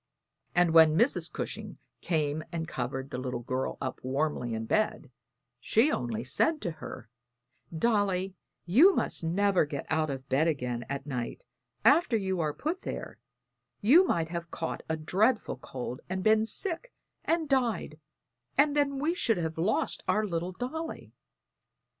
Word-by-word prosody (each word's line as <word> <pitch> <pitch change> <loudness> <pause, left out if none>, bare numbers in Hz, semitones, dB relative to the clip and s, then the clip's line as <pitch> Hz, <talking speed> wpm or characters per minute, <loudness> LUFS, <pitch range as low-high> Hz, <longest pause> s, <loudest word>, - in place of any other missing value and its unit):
And 175 -2 +4
when 160 -1 +7
Mrs. 240 +8 +2
Cushing - - -5 0.2
came 155 -2 0
and 165 -2 -3
covered 135 0 -4
the 125 - -3
little 125 -2 -4
girl 130 +2 -2
up 130 - -4
warmly 130 -3 -1
in 110 0 -3
bed, 215 - 0 0.5
she 225 - +3
only 115 -2 -2
said 310 - +1
to 175 - -2
her, 120 - -8 0.6
"Dolly, 195 0 +1 0.3
you 285 - +6
must - - 0
never 190 +3 +2
get 145 -2 -5
out 155 -1 +1
of 135 -1 -5
bed 140 +5 +2
again 125 -6 -2
at 140 0 -4
night 125 - -4 0.4
after 295 -9 +5
you 190 -3 -1
are 155 -2 +1
put 320 - -3
there; - - -6 0.6
you 280 - +6
might 165 - 0
have 170 0 -5
caught 165 - -4
a 160 - 0
dreadful 215 +10 +1
cold 125 -1 -6
and 185 0 -2
been 220 0 +4
sick 390 - -2 0.3
and 330 -1 0
died, 240 - 0 0.6
and 290 +1 +4
then 280 -1 +1
we 305 +5 +1
should 230 - +1
have 160 -2 -3
lost 195 +6 0
our 215 0 +2
little 175 -1 -2
Dolly." 315 - -5
170 Hz, 155 wpm, -29 LUFS, 140-230 Hz, 0.6 s, when